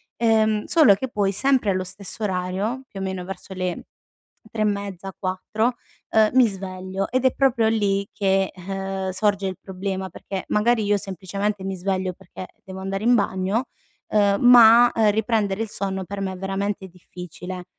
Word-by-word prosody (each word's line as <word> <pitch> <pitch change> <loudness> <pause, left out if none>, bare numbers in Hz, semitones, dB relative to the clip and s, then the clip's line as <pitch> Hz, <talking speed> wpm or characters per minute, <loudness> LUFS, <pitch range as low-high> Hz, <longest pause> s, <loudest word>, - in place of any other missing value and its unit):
ehm, 220 -2 +2
solo 295 -12 +5
che 260 +6 -5
poi 200 -3 0
sempre 265 -1 +2
allo 185 0 -1
stesso 195 +4 -5
orario, 195 +6 -2
più 195 - -8
o - - -2
meno 190 -1 -3
verso 190 0 -8
le 185 -1 -3 0.6
3 220 -2 -4
e - - +3
mezza 200 -2 -3
4, 215 +5 -1 0.3
ehm, 215 -1 +4
mi 255 -2 +6
sveglio 190 -1 -5
ed 255 0 0
è 260 - +4
proprio 240 -5 +2
lì 200 -3 +1
che, 195 -1 +1
uhm, 195 +1 -4
sorge 200 +1 0
il 185 -2 -5
problema 190 0 -4
perché 190 +2 -6
magari 225 +1 +2
io 205 0 +2
semplicemente 195 +1 -3
mi 190 0 -3
sveglio 185 0 -2
perché 185 0 -10 0.2
devo 190 0 -9
andare 195 +1 -4
in 240 +2 +4
bagno, 200 +3 0 0.4
uhm, 200 -1 +2
ma, 240 -1 +8
uhm, 215 -2 +4
riprendere 215 -1 0
il 225 - -3
sonno 190 -2 -3
per 200 +2 -6
me 190 -1 -2
è 185 - -7
veramente 195 0 -3
difficile. 180 0 -9
195 Hz, 170 wpm, -23 LUFS, 190-215 Hz, 0.6 s, ma